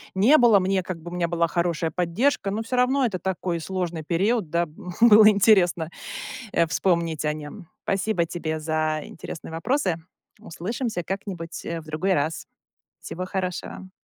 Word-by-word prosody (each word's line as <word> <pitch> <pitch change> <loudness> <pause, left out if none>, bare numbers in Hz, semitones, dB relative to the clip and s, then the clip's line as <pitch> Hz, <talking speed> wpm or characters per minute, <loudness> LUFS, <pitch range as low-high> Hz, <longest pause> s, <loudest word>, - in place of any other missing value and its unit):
не 235 +11 +6
было- 230 -5 +6
мне 190 0 0
как 180 -2 -5
бы 175 +2 -8
у - - -8
меня 175 -1 0
была 170 0 +1
хорошая 170 -1 -1
поддержка, 195 +6 0
но 215 +3 -2
всё 230 +3 -3
равно 255 +2 +3
это 200 -6 -2
такой 180 -1 -2
сложный 175 -2 -3
период, 190 +3 0
да, 170 +1 +1
б 155 - -18 0.3
было 215 -2 +9
интересно, 190 -6 +4 0.6
э, 170 - +4
вспомнить 165 -2 0
о 150 - +1
нём. 155 +5 -9 0.2
Спасибо 195 -2 0
тебе 160 -2 -4
за 155 0 -1
интересные 165 - -9
вопросы, 180 - 0 0.4
услышимся 220 +1 -4
как-нибудь, 180 -2 -5
э, 165 0 -4
в 155 - -18
другой 160 +5 0
раз. 155 -1 -1 0.6
Всего 185 +2 -5
хорошего. 185 0 -4
180 Hz, 160 wpm, -24 LUFS, 165-200 Hz, 0.6 s, было